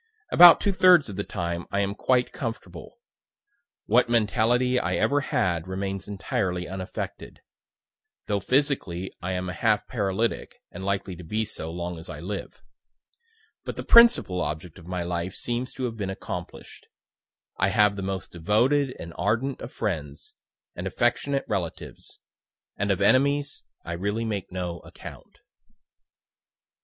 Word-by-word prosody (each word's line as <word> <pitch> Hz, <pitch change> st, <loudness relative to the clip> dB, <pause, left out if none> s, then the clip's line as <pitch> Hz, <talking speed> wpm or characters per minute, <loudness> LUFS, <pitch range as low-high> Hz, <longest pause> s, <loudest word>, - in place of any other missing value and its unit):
About 175 Hz, -1 st, +10 dB
two 200 Hz, -, +1 dB
thirds 180 Hz, -, +6 dB
of 100 Hz, -, -6 dB
the 100 Hz, -, -2 dB
time 85 Hz, -1 st, -4 dB
I 100 Hz, -, 0 dB
am 100 Hz, 0 st, -1 dB
quite 125 Hz, +3 st, +1 dB
comfortable. 115 Hz, -2 st, -7 dB, 0.9 s
What 120 Hz, +3 st, +3 dB
mentality 120 Hz, +3 st, +2 dB
I -, -, -1 dB
ever 145 Hz, -, +2 dB
had 85 Hz, -, 0 dB
remains 95 Hz, 0 st, -4 dB
entirely 95 Hz, -3 st, -2 dB
unaffected; 95 Hz, 0 st, -6 dB, 0.8 s
though 100 Hz, -1 st, 0 dB
physically 125 Hz, -, 0 dB
I 95 Hz, +1 st, -2 dB
am 90 Hz, 0 st, -3 dB
a 90 Hz, -, -4 dB
half 110 Hz, -3 st, +1 dB
paralytic, 110 Hz, 0 st, -1 dB, 0.2 s
and 95 Hz, -, -8 dB
likely 100 Hz, -1 st, -2 dB
to 90 Hz, -, -10 dB
be 110 Hz, +7 st, -1 dB
so, 80 Hz, -6 st, -6 dB
long 85 Hz, 0 st, -5 dB
as 80 Hz, -, -11 dB
I 75 Hz, -, -7 dB
live. 95 Hz, +4 st, -6 dB, 1.0 s
But -, -, -5 dB
the -, -, -5 dB
principal 235 Hz, -, +6 dB
object 80 Hz, +1 st, -5 dB
of 85 Hz, -, -14 dB
my 90 Hz, -1 st, -2 dB
life 85 Hz, +1 st, -3 dB
seems 120 Hz, +1 st, -3 dB
to 130 Hz, -, -5 dB
have 115 Hz, -2 st, -3 dB
been 100 Hz, -3 st, -3 dB
accomplish'd 95 Hz, -, -7 dB, 0.7 s
I 95 Hz, -, +3 dB
have 105 Hz, 0 st, +3 dB
the 100 Hz, -, -5 dB
most 95 Hz, 0 st, -4 dB
devoted 125 Hz, -, +1 dB
and 85 Hz, 0 st, -8 dB
ardent 115 Hz, +6 st, 0 dB
of -, -, -7 dB
friends, 75 Hz, -10 st, -4 dB, 0.4 s
and -, -, -4 dB
affectionate 135 Hz, +3 st, 0 dB
relatives 95 Hz, -6 st, -5 dB, 0.6 s
and 100 Hz, +1 st, -2 dB
of 100 Hz, 0 st, +1 dB
enemies 140 Hz, +6 st, +2 dB, 0.2 s
I 85 Hz, -, -4 dB
really 100 Hz, +6 st, -2 dB
make 105 Hz, -4 st, -4 dB
no 90 Hz, -2 st, -4 dB
account." -, -, -12 dB
100 Hz, 150 wpm, -26 LUFS, 90-120 Hz, 1.0 s, About